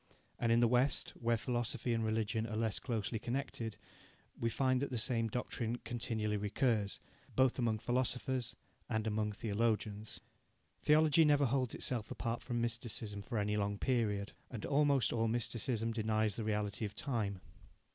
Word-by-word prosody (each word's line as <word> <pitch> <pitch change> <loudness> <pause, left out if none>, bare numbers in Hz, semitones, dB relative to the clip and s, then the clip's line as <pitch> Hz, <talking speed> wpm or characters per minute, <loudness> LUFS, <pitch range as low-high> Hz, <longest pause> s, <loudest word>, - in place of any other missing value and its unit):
And 115 -1 +2
in 115 +1 +5
the 120 - +6
West, 125 +3 +2
where 115 -1 0
philosophy 120 0 -1
and 115 -1 +1
religion 110 0 0
are 110 - -4
less 110 -2 0
closely 110 -2 -2
connected, 120 -3 -3 0.6
we 115 - +1
find 130 +2 +2
that 140 - -1
the 125 - -2
same 115 -1 +1
doctrine 120 0 -2
continually 110 -3 -1
recurs, 105 0 0 0.4
both 130 0 +3
among 115 -3 +2
philosophers 125 +1 -1 0.3
and 110 0 0
among 105 -1 0
theologians. 105 0 -1 0.6
Theology 155 +1 +6
never 145 -2 +5
holds 130 -1 0
itself 120 -4 -2
apart 115 0 -2
from 120 -2 -2
mysticism 115 -3 -2
for 115 +3 -4
any 105 0 +1
long 100 0 0
period, 105 -5 0 0.2
and 115 -5 -5
almost 140 -2 +3
all 115 -1 +2
mysticism 115 0 -1
denies 110 -2 +1
the 115 - -3
reality 105 0 -1
of 105 -1 -3
time. 105 -8 -1
115 Hz, 155 wpm, -35 LUFS, 110-125 Hz, 0.6 s, the